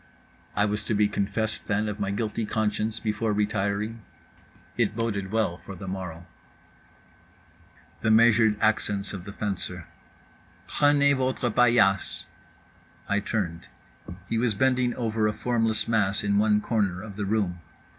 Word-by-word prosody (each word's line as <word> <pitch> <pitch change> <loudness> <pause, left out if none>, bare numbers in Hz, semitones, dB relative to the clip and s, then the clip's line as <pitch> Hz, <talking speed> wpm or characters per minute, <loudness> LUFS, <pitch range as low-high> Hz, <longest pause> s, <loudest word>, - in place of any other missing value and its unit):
I 105 - +3
was 105 0 -1
to 110 - 0
be 105 0 +4
confessed, 105 +2 -2
then, 105 +1 0
of 105 0 -4
my 100 - -1
guilty 110 +2 -2
conscience, 110 +1 -1
before 110 0 -1
retiring? 105 +2 -1 0.7
It - - +1
boded 100 -4 -2
well 110 -6 0
for 95 - -9
the 95 0 -8
morrow.… 90 -3 -6 1.8
the - - +1
measured 110 -1 +5
accents 105 -2 0
of 95 -2 -7
the 100 - -7
fencer: 95 -4 -4 0.8
"Prenez 145 -1 +4
votre 130 -2 0
paillasse." 115 -5 +3 0.8
I 100 0 +1
turned. 90 -5 -3 0.6
He 115 - 0
was 115 -3 +1
bending 125 +1 +2
over 110 -2 0
a 105 - 0
formless 115 -2 0
mass 105 -4 +1
in 100 0 +2
one 105 0 +3
corner 100 -5 -1
of 105 -2 -9
the 105 0 -3
room. 100 -4 0
105 Hz, 140 wpm, -26 LUFS, 100-115 Hz, 1.8 s, measured